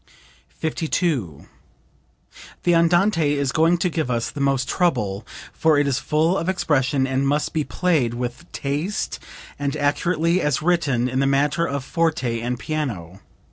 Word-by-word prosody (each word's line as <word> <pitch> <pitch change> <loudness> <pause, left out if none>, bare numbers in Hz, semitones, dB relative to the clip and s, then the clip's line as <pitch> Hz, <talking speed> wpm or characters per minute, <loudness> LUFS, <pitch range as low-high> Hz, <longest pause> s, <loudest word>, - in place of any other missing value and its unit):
52. 155 - -2 1.2
"The 175 - +3
Andante 170 -2 +3
is 140 -2 0
going 165 +4 +3
to 175 - 0
give 160 -6 -2
us 120 -2 -1
the 145 - -6
most 135 -1 +1
trouble, 105 - 0 0.3
for 160 -2 +3
it 145 - +3
is 135 -1 0
full 160 +6 +1
of 165 - -2
expression 140 -6 +1
and 135 +1 0
must 145 +2 0
be 155 - 0
played 145 -9 0
with 125 +7 -5
taste 150 +10 -3 0.4
and 145 +1 -2
accurately 165 +4 +1
as 150 -4 +1
written 150 -8 +1
in 130 +1 -1
the 135 - +2
matter 145 +5 +1
of 140 -1 -3
forte 135 -7 -1
and 120 +1 -2
piano. 110 - -4
145 Hz, 150 wpm, -22 LUFS, 130-165 Hz, 1.2 s, The